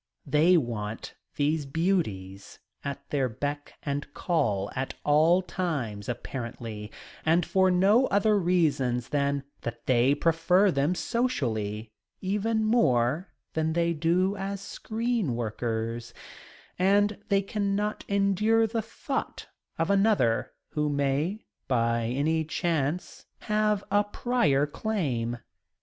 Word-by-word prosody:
They 155 +5 +4
want 115 -6 -3 0.2
these 150 0 0
beauties 135 - -2 0.3
at 140 -1 -5
their 135 -3 +1
beck 145 +5 -4
and 145 0 -3
call 105 - 0
at 130 +1 -3
all 160 +5 +4
times, 130 - -3
apparently, 115 -3 -5 0.3
and 165 +1 +3
for 190 -1 +3
no 200 +8 +4
other 205 +1 +3
reason 155 -9 +2
than 140 -1 0 0.2
that 120 0 -6
they 130 +2 +4
prefer 165 +5 +3
them 145 +4 +1
socially 115 - -1 0.3
even 210 +3 0
more 155 - +2 0.2
than 160 0 0
they 170 0 +1
do 175 +5 +1
as 195 0 -3
screen 220 - -2
workers 115 0 -3 0.6
and 205 +2 +3
they 200 0 +3
cannot 205 +1 -1
endure 200 +3 +3
the 225 +1 -1
thought 225 +5 -5 0.3
of 165 +4 +1
another 195 - +2 0.2
who 150 -1 -1
may, 145 +8 -1 0.2
by 115 -2 +1
any 150 +6 +1
chance, 160 +1 -2
have 210 -1 +1
a 205 +1 +4
prior 205 - +1
claim. 145 - -2
160 Hz, 115 wpm, -27 LUFS, 125-195 Hz, 0.6 s, They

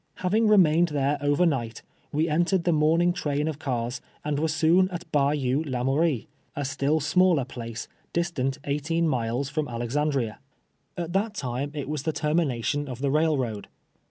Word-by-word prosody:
Having 215 +5 +1
remained 175 -5 +5
there 145 -1 0
over 145 +4 +3
night, 120 -8 -1 0.3
we 155 +3 +1
entered 170 +3 +1
the 175 - +2
morning 165 +3 +3
train 150 -2 -1
of 155 -2 -3
cars, 125 -3 -2 0.2
and 150 -1 0
were 160 - +1
soon 165 +4 +3
at 175 -1 -6
Bayou 140 -1 +1
Lamoui 135 +4 +1
ie, - - -24 0.3
a 145 - -2
still 145 +3 +1
smaller 160 -1 +3
place, 115 -3 -7 0.2
distant 160 -6 -1
eighteen 160 +4 0
miles 125 -1 -1
from 150 +1 -2
Alexandria. 120 0 -1 0.6
At 170 -1 -4
that 210 +3 0
time 130 -3 -3
it 145 -3 -4
was 150 -1 -2
the 160 +2 -2
termination 145 -3 0
of 125 -3 -5
the 135 +1 -1
railroad. 135 -9 0
150 Hz, 160 wpm, -26 LUFS, 135-165 Hz, 0.6 s, remained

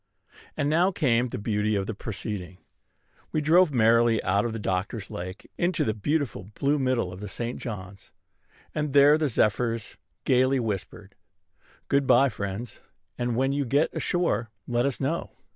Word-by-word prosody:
And 145 - 0
now 170 +6 +3
came 125 -8 +1
the 125 - -5
beauty 105 -1 0
of 100 -1 0
the 115 - -4
proceeding. 100 -3 -6 0.7
We 155 - 0
drove 160 +3 +4
merrily 115 -2 +4
out 100 +3 +1
of 115 -1 -3
Doctors 95 +3 -2
Lake 90 +2 -7
into 175 0 +1
the 110 - 0
beautiful 110 - -2
blue 145 +1 +1
middle 125 -8 0
of 90 - -9
the 105 - -6
St. 120 +3 -4
John's: 100 -4 -8 0.6
and 150 -2 -2
there 145 +1 +7
the 155 -2 +1
zephyrs 115 0 0 0.3
gayly 130 +1 +3
whispered, 100 -3 -4 0.7
"Good 140 -1 +2
by, 140 - +5
friends; 100 +1 -6 0.4
and, 120 -1 -1
when 135 +2 +1
you 140 +1 0
get 140 +5 +1
ashore, 125 -11 0 0.2
let 120 +2 +1
us 140 - -3
know." 150 +5 -2
120 Hz, 160 wpm, -26 LUFS, 105-140 Hz, 0.7 s, there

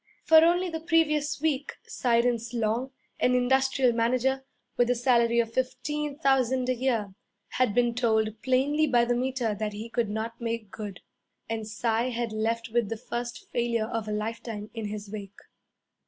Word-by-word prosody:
For 320 0 +8
only 350 +2 +3
the 325 -2 -4
previous 305 -3 +1
week 295 -2 -1
Cyrus 235 -1 0
Long, 230 +3 0 0.3
an 250 - +3
industrial 265 0 +3
manager, 255 +3 +1 0.3
with 245 0 +2
a 250 - +3
salary 235 -1 +3
of 230 -1 0
fifteen 280 +3 -2
thousand 260 -3 +2
a - - +3
year, 230 -6 -1 0.4
had 250 -5 +1
been 240 -1 +3
told 220 -2 +1
plainly 280 +4 +2
by 240 -3 +4
the 245 - +1
Meter 250 -3 -1
that 210 0 -3
he 215 +3 -6
could 235 -3 0
not 225 +3 -4
make 230 -3 -3
good. 205 -4 -7 0.5
And 225 -1 -3
Cy 225 +3 0
had 235 -2 -2
left 230 +2 -1
with 230 -2 0
the 225 - -3
first 240 0 -6
failure 235 -2 0
of 225 -1 -4
a - - -3
lifetime 215 0 -4
in 225 -2 -4
his 210 0 -6
wake. 200 -2 -8
235 Hz, 170 wpm, -27 LUFS, 225-260 Hz, 0.5 s, For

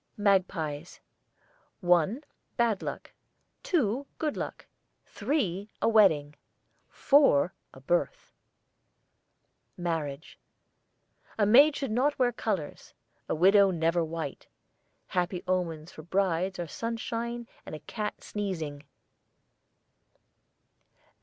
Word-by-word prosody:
MAGPIES. 180 -6 0 0.8
One, 180 - +2 0.3
bad 230 -5 +2
luck; - - -6 0.5
two, 275 - 0
good 305 -2 -1
luck; - - -5 0.4
three, 210 - -2
a - - +1
wedding; 175 -10 +4 0.6
four, 270 - +4 0.2
a - - -14
birth. 175 - -1 1.4
MARRIAGE. 160 -4 -4 1.0
A 210 - +3
maid 280 +8 +7
should 275 -5 -3
not 265 +6 +1
wear 250 -2 +3
colours; 200 -9 -4 0.3
a - - +1
widow 195 +4 +6
never 170 -1 +1
white. 160 -3 -5 0.6
Happy 180 0 -2
omens 170 -3 -2
for - - -10
brides 185 +2 0
are 175 - -3
sunshine 230 +5 -4 0.2
and - - -7
a - - -8
cat 210 +7 -5
sneezing. 165 -9 -4
190 Hz, 95 wpm, -29 LUFS, 165-230 Hz, 1.4 s, maid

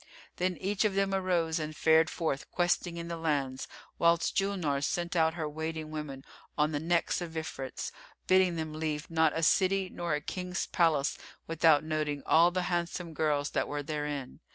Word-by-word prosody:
Then 180 0 0
each 195 +2 0
of 210 -3 +1
them 195 0 +1
arose 175 -4 +1
and 155 0 -4
fared 160 +1 +4
forth 155 -5 -2
questing 175 -1 0
in 170 0 -5
the 170 0 -4
lands, 140 -5 -1 0.3
whilst 170 0 +3
Julnar 180 -8 0
sent 175 +3 -1
out 160 -1 +3
her 160 -3 -2
waiting 160 +1 -4
women 145 -3 -6 0.3
on 150 0 +2
the 145 - -1
necks 170 +3 +1
of 170 -2 -5
Ifrits, 135 -4 -5 0.3
bidding 185 -2 +4
them 160 -1 -4
leave 155 0 -3
not 160 -1 +3
a 165 - -1
city 190 +2 +3
nor 170 -3 -1
a 150 - -3
King's 180 +3 -3
palace 155 -5 +1 0.3
without 160 -2 +4
noting 155 -2 -2
all 170 +2 +6
the 180 0 -1
handsome 175 -1 -2
girls 150 -2 0
that - - 0
were 145 0 -3
therein. 145 -3 -4
160 Hz, 175 wpm, -30 LUFS, 150-175 Hz, 0.3 s, all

